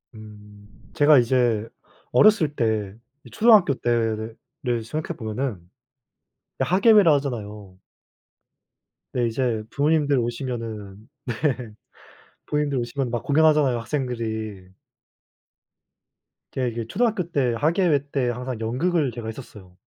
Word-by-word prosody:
음 105 -1 -14 0.3
제가 150 -1 +5
이제 120 -3 +1 0.4
어렸을 190 -9 +4
때 110 -5 -1 0.3
이 - - -12
초등학교 215 -9 +5
때를 115 -3 -1 0.5
생각해 155 +6 -5
보면은 110 -1 -3 1.0
이 - - +3
학예회라 200 -1 +5
하잖아요. 105 -8 -6 1.4
네. 125 -1 +1
이제 115 -2 -1
부모님들 145 0 +1
오시면은 115 -4 -5 0.2
네. 120 - -3 1.1
부모님들 150 -2 -1
오시면 125 +2 -3
막 120 -1 -3
공연하잖아요, 150 -4 +3
학생들이. 115 -6 -4 1.8
제가 130 -1 -2
이제 115 -1 -4
초등학교 210 - 0
때 130 -6 +1
학예회 155 -1 +1
때 130 -3 0
항상 125 0 -4
연극을 140 +5 0
제가 115 -1 -7
했었어요. 105 -6 -10
125 Hz, 255 characters per minute, -23 LUFS, 110-145 Hz, 1.8 s, 제가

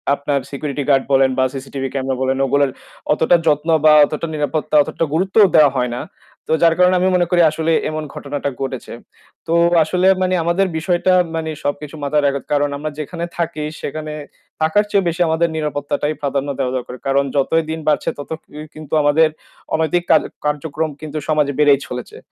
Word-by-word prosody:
আপনার 140 0 -1
security 140 0 -4
guard 135 -1 +4
বলেন 135 0 +5
বা - - +4
CCTV 135 0 -5
camera 135 -1 -2
বলেন 130 0 0
ওগুলার 140 +1 +2 0.4
অতটা 160 +3 +3
যত্ন 150 +2 +1 0.2
বা 155 - +8
অতটা 155 +3 -4
নিরাপত্তা 150 +1 -2
অতটা 165 - -2
গুরুত্ব 190 +4 -1 0.2
দেওয়া 145 -3 +6
হয় 125 -1 0
না। - - -4 0.5
তো - - -4
যার 165 -1 +6
কারণে 180 0 +4
আমি 185 - +2
মনে 175 -2 +2
করি 175 -1 +4
আসলে 160 +1 -1 0.2
এমন 155 0 -4
ঘটনাটা 140 0 -4
ঘটেছে। 130 -2 -5 0.5
তো 165 - 0 0.3
আসলে 180 +4 +1
মানে 185 0 +1
আমাদের 180 +3 +1
বিষয়টা 175 +2 +1 0.2
মানে 160 -1 -3
সবকিছু 145 +1 -4
মাথায় 145 +1 +1
রাখতে 140 -1 0
কারণ 145 0 +2
আমরা 155 +1 -4
যেখানে 170 +3 -4
থাকি 165 -3 -2 0.2
সেখানে 155 +1 -5 0.5
থাকার 185 +7 +2
চেয়ে 195 -3 +2
বেশি 170 +2 -4
আমাদের 165 +1 +1
নিরাপত্তাটাই 150 0 -2
প্রাধান্য 140 0 -2
দেওয়া 130 -1 -1
দরকার। 125 0 -7
কারণ 140 +1 +2
যতই 160 +4 +2
দিন 160 - -4
বাড়ছে 150 - +1
তত 145 - -8
কি 150 - -15 0.2
কিন্তু 155 0 -10
আমাদের 155 +2 +4 0.4
অনৈতিক 160 +2 +1
কার - - +6 0.2
কার্যক্রম 150 +1 -2
কিন্তু 155 0 -6
সমাজে 150 -2 +1
বেড়েই 145 -2 +5
চলেছে। 125 0 -7
150 Hz, 175 wpm, -18 LUFS, 140-160 Hz, 0.5 s, বা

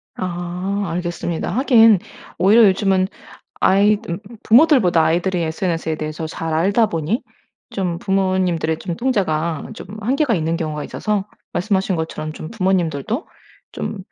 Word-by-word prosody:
아. 175 -1 -4 0.4
알겠습니다. 170 -1 -3
하긴 225 -3 +5 0.4
오히려 215 +5 +6
요즘은 190 -1 +2 0.5
아이들 200 -2 +2 0.2
부모들보다 230 - +5
아이들이 175 +3 +1
SNS에 165 0 -2
대해서 155 +1 -4
잘 160 +1 -4
알다 195 +8 +3
보니 175 - -2 0.5
좀 180 -4 -2
부모님들의 185 -5 0
좀 170 -1 -5
통제가 170 - -1
좀 - - -9
한계가 260 +3 +1
있는 165 -2 0
경우가 155 -3 -3
있어서 210 -2 -2 0.3
말씀하신 190 0 0
것처럼 160 -1 -4
좀 155 - -8
'부모님들도 190 - -1 0.5
좀 210 - -4
185 Hz, 315 characters per minute, -20 LUFS, 165-210 Hz, 0.5 s, 오히려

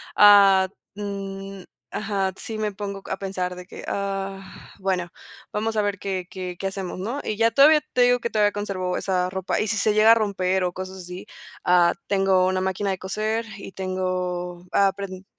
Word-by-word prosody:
ah, 200 -2 +7 0.3
mm, 195 -1 -6 0.3
ajá, 195 -3 -1
sí 220 - -6
me 215 -2 -2
pongo 200 0 -5
a 190 - -2
pensar 185 -2 -3
de 180 0 -9
que, - - -10
ah, 195 -1 -3 0.4
bueno, 185 -2 -1 0.4
vamos 220 +1 -1
a - - +4
ver 205 -1 -1
qué 185 -2 -4
qué 180 -1 -6
qué 195 - -1
hacemos, 190 -2 -5
¿no?, 235 +9 -3
y 210 - -3
ya 230 0 +4
todavía, 300 +4 +6
te 250 - +3
digo 245 0 +5
que 235 - -2
todavía 210 -1 +3
conservo 195 -3 -2
esa 180 -1 0
ropa, 190 0 -2
y 215 - -1
si 215 +1 0
se 210 +1 +2
llega 215 +1 +6
a - - +8
romper 190 -3 0
o 180 - -2
cosas 185 0 -6
así, 180 0 -8 0.4
ah, 175 -1 +5
tengo 195 -2 +3
una 185 0 +1
máquina 190 +1 -1
de 190 - -2
coser 215 +4 -2
y 195 - -9
tengo, 180 -2 -3
ah, 200 - +5
aprend 195 -1 -5
195 Hz, 190 wpm, -24 LUFS, 185-205 Hz, 0.4 s, a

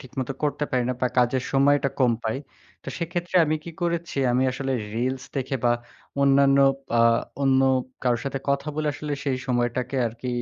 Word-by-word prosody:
ঠিকমতো 130 0 -5
করতে 150 0 0
পারি 125 -1 +1
না, 125 - 0
বা 125 - +3
কাজের 125 +1 +2
সময়টা 140 +1 +3
কম 125 -2 +4
পাই। 110 +3 -1 0.5
তো - - -8
সেক্ষেত্রে 175 +1 -2
আমি 155 0 0
কি 170 - -6
করেছি, 170 -3 -2
আমি 125 +1 +2
আসলে 135 0 -3 0.2
রিলস 130 +3 -2
দেখে 135 0 -1
বা 120 - +5 0.5
অন্যান্য 140 0 +5 0.4
আ - - +5 0.4
অন্য 135 -1 +4 0.4
কারোর 120 -2 +1
সাথে 135 0 -2
কথা 140 +2 0
বলে 155 -1 0
আসলে 150 +2 -5
সেই 130 -2 0
সময়টাকে 125 +1 -1
আরকি 115 +3 -6
135 Hz, 175 wpm, -24 LUFS, 125-145 Hz, 0.5 s, বা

